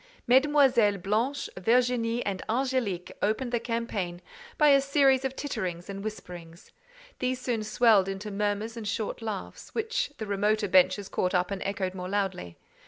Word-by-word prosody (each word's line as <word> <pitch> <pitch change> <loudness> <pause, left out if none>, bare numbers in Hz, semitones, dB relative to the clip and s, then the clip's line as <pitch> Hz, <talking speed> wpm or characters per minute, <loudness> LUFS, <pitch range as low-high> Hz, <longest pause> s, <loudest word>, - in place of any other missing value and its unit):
Mesdemoiselles 250 -7 +4
Blanche, 230 +8 0
Virginie, 235 +3 +1
and 195 -2 -2
Angélique 240 -7 -1
opened 230 +4 0
the 240 - +1
campaign 225 -7 -3 0.4
by 300 -2 +5
a 275 -1 +6
series 275 -1 +3
of 265 0 -2
titterings 180 - -4
and 195 0 -7
whisperings; 175 -5 -9 0.5
these 255 0 -1
soon 245 -3 -2
swelled 215 -3 +4
into 195 +2 -5
murmurs 205 +2 -2
and 225 -3 -6
short 215 +2 -3
laughs, 215 -4 -6
which 450 -8 -1
the 220 - -4
remoter 210 +1 +1
benches 185 +2 +3
caught 180 0 -1
up 180 +2 +1
and 195 -1 -3
echoed 195 -2 -2
more 180 -1 -6
loudly. 190 - -2
215 Hz, 155 wpm, -28 LUFS, 195-250 Hz, 0.5 s, a